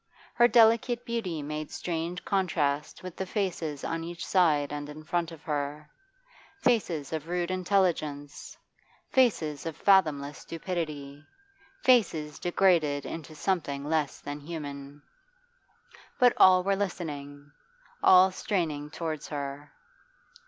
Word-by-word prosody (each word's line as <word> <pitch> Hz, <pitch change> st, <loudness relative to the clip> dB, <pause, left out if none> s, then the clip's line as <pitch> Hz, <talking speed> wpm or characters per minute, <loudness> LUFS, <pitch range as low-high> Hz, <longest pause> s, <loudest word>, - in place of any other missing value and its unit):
Her 240 Hz, 0 st, +5 dB
delicate 235 Hz, +1 st, +4 dB
beauty 190 Hz, -10 st, -3 dB
made 150 Hz, +1 st, -5 dB
strange 170 Hz, +1 st, -4 dB
contrast 160 Hz, -6 st, -1 dB
with 185 Hz, -2 st, -7 dB
the 190 Hz, -, -4 dB
faces 170 Hz, -8 st, -3 dB
on 165 Hz, 0 st, -3 dB
each 170 Hz, 0 st, -6 dB
side 150 Hz, -6 st, +2 dB
and 145 Hz, 0 st, -5 dB
in 155 Hz, +1 st, -9 dB
front 170 Hz, +1 st, -1 dB
of 160 Hz, -2 st, -12 dB
her 150 Hz, 0 st, -4 dB, 0.7 s
faces 190 Hz, -, 0 dB
of 160 Hz, 0 st, -4 dB
rude 175 Hz, 0 st, -1 dB
intelligence, 175 Hz, -6 st, -1 dB, 0.5 s
faces 165 Hz, -, +2 dB
of 160 Hz, -, -5 dB
fathomless 155 Hz, -7 st, +3 dB
stupidity, 155 Hz, -5 st, -5 dB, 0.6 s
faces 165 Hz, -, +2 dB
degraded 170 Hz, -6 st, +2 dB
into 160 Hz, -1 st, -7 dB
something 150 Hz, -5 st, -1 dB
less 150 Hz, -2 st, -1 dB
than 145 Hz, +1 st, -6 dB
human. 145 Hz, -2 st, -8 dB, 1.1 s
But 245 Hz, -1 st, +5 dB
all 185 Hz, -1 st, +7 dB
were 195 Hz, +1 st, +2 dB
listening, 145 Hz, -7 st, -5 dB, 0.5 s
all 185 Hz, 0 st, +7 dB
straining 160 Hz, -7 st, -2 dB
towards 155 Hz, -1 st, -4 dB
her. 145 Hz, 0 st, -6 dB
160 Hz, 115 wpm, -28 LUFS, 145-185 Hz, 1.1 s, all